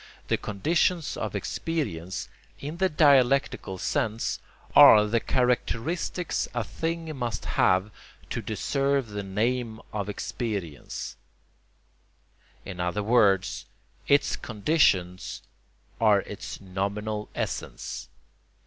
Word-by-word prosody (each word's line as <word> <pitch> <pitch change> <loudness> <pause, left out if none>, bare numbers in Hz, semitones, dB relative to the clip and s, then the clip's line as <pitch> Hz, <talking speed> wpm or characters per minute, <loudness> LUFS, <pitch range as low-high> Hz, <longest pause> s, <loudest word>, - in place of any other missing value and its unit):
The - - +3
conditions 160 - 0
of - - -4
experience, 95 - -3 0.3
in 150 +4 -6
the 190 +1 +2
dialectical 140 - +3
sense, 115 - -1 0.4
are 105 -1 +9
the 115 +2 +1
characteristics 125 +9 0
a 120 - 0
thing 165 +5 -3
must 120 -4 -3
have 95 +3 +2 0.4
to - - -2
deserve 140 -3 0
the 105 0 -4
name 110 +3 -1
of 105 -1 -2
experience; 90 - -4 1.5
in 90 -3 -7
other 90 +4 -1
words, 100 -4 +3 0.4
its 145 0 +3
conditions 100 - +1 0.6
are - - +5
its - - -7
nominal 100 +3 -3
essence. - - -4
110 Hz, 95 wpm, -27 LUFS, 100-140 Hz, 1.5 s, are